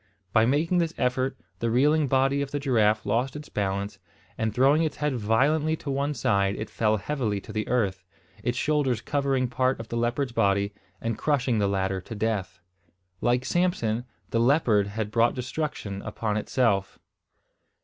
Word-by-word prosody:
By 110 0 +5
making 160 +7 +2
this 165 -1 -1
effort, 130 +1 0 0.2
the 115 - 0
reeling 145 +5 +3
body 135 +2 +2
of 140 - -3
the 145 - -2
giraffe 110 -6 +2
lost 125 +4 0
its 150 0 -8
balance, 100 0 -2 0.4
and 110 -1 -1
throwing 135 +7 +4
its 155 -2 -1
head 150 -2 -1
violently 140 +8 +2
to 145 -3 -5
one 140 +2 -1
side 100 -4 +1
it 110 - -6
fell 110 -1 +1
heavily 110 -2 -2
to 110 - -10
the 110 0 -2
earth, 100 -7 0 0.4
its 120 +3 -1
shoulders 145 -5 +1
covering 135 -3 0
part 130 +1 0
of 115 - -8
the 115 - -3
leopard's 120 +3 0
body, 100 -3 +1 0.3
and 115 -1 -3
crushing 130 -6 +1
the 100 - +2
latter 95 -1 -1
to 115 - -8
death. 105 -3 -2 0.6
Like 125 +1 +1
Samson, 125 -9 0 0.3
the 115 - +1
leopard 115 -5 +3
had 105 +1 -4
brought 115 +1 +3
destruction 125 -6 -4
upon 105 0 -3
itself! 105 -3 0
120 Hz, 170 wpm, -26 LUFS, 105-140 Hz, 0.6 s, By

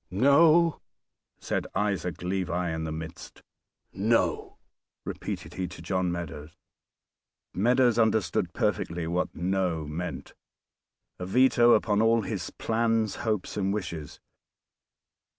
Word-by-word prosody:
"No!!" 155 - +4 0.6
said - - -2
Isaac 95 -4 -1
Levi 90 -2 -1
in 80 0 -3
the 80 - -4
midst. 80 +1 -8 0.5
"No!!" 110 +4 0 0.5
repeated - - -5
he 95 0 -3
to 90 -1 -11
John 90 0 0
Meadows. 80 -3 -6 1.0
Meadows 120 +3 +3
understood 110 -4 +1
perfectly 85 0 -1
what 90 +2 -2
"No" 90 -3 -1
meant; 80 +4 -6 0.9
a 90 - -4
veto 120 +2 +5
upon 105 -2 +2
all 115 0 +3
his 95 -5 -4
plans, 115 -1 0
hopes 110 -4 -2
and 100 -1 0
wishes. 85 -7 -5
95 Hz, 110 wpm, -27 LUFS, 85-115 Hz, 1.0 s, veto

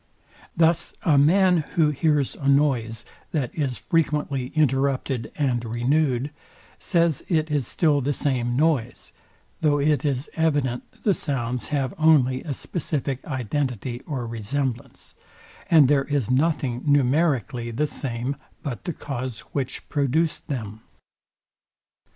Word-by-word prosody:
Thus 165 0 +2
a 160 -7 +4
man, 180 +5 +5 0.2
who 155 -3 +3
bears 145 -2 +1
a 140 - -4
noise, 125 -6 +2 0.3
that 140 -7 -1
is 135 -6 -2
frequently 150 -5 0
interrupted 135 -4 +1
and 125 -5 0
renewed, 130 +3 0 0.5
says, 170 -5 +1
it 160 -3 0
is 145 -5 0
still 150 -4 +2
the 140 +3 0
same 125 -4 0
noise; 140 -5 0 0.5
though 145 -2 +3
it 145 -2 +2
is 140 -1 -1
evident 145 -6 0 0.2
the 205 - +4
sounds 125 -6 -2
have 140 -4 -1
only 140 -5 +4
a 145 -4 -4
specific 140 -5 -3
identity 125 -2 -3
or 135 -6 -3
resemblance, 115 +2 -4 0.6
and 155 -5 +7
there 140 -1 +3
is 140 -5 -1
nothing 135 -3 +1
numerically 135 - +1
the 125 +6 0
same, 130 -2 -3 0.3
but 135 -1 -5
the 175 - -2
cause, 130 -5 -5
which 135 -3 -3
produced 150 +3 0
them. 110 -6 -5
140 Hz, 125 wpm, -24 LUFS, 125-150 Hz, 0.6 s, and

